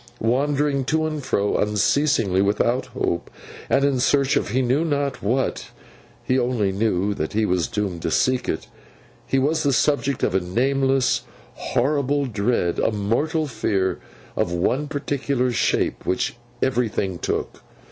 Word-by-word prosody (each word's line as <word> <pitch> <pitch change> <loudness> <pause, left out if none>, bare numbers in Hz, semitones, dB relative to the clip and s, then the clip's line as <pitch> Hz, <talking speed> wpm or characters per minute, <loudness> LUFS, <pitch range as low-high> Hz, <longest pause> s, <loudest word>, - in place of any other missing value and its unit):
Wandering 140 +3 +1
to 155 +3 +1
and 155 -2 -3
fro, 105 -6 0
unceasingly, 105 -1 +2
without 120 +6 +1
hope, 120 -9 -2 0.4
and 140 +1 +3
in 140 -2 +1
search 135 +2 +2
of - - 0
he 130 +5 +1
knew 130 +6 +2
not 140 -4 -1
what 125 +6 -1 0.5
(he 130 +1 +1
only 120 -5 0
knew 100 -1 0
that 80 -5 -4
he 110 +1 +2
was 90 -3 +1
doomed 100 -5 -3
to - - -1
seek 130 +9 +1
it), - - -3 0.6
he 135 - +1
was 145 +4 +1
the 140 - +2
subject 140 0 +1
of - - +1
a 95 - +3
nameless, 135 +7 +1 0.3
horrible 140 +1 0
dread, 105 -6 0
a - - +2
mortal 120 +10 0
fear 100 -8 -1 0.4
of - - 0
one 125 +12 0
particular 140 -3 -1
shape 120 - 0
which 125 +8 -1 0.3
everything 115 -8 0
took. - - -3
125 Hz, 145 wpm, -23 LUFS, 105-140 Hz, 0.6 s, and